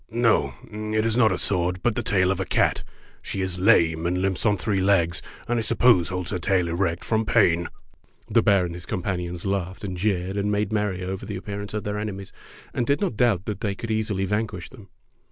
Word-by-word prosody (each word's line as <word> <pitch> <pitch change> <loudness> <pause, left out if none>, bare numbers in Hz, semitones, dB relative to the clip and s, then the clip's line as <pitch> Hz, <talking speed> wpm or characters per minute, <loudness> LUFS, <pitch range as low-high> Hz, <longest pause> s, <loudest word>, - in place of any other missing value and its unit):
No, 115 - +2
it 110 +1 -2
is 115 -1 +2
not 115 -3 +4
a - - 0
sword, 90 -2 +1
but 120 - +2
the 120 - -2
tail 95 -4 +2
of 95 - -2
the 95 - -1
cat. - - +1 0.4
She - - -5
is 95 -1 -1
lame 85 -5 +3
and 90 +1 0
limps 95 +3 0
on 105 -1 +3
three 100 0 0
legs 90 -4 +2 0.3
and 120 0 +1
I - - 0
suppose 110 -4 +4
holds 90 -1 -3
her 90 - -2
tail 90 -1 +1
erect 85 0 -1
from 110 -1 +1
pain." 85 -5 +3 0.6
The - - +3
bear 100 -3 +3
and 85 - -5
his 85 0 -7
companions 90 -3 -3
laughed 95 -1 -2
and 95 -2 -4
jeered 95 0 -1
and 100 +1 0
made 105 0 -1
merry 105 -4 -1
over 95 +1 -4
the 105 - -5
appearance 100 +2 -6
of 105 - -2
their 105 0 -3
enemies 100 -2 -6 0.4
and 120 - -1
did 140 - +2
not 195 - -1
doubt 105 -6 +2
that 105 -1 -4
they 100 -4 -1
could 115 +4 -5
easily 105 -3 0
vanquish 105 -2 -3
them. 100 -3 -15
100 Hz, 220 wpm, -24 LUFS, 90-110 Hz, 0.6 s, not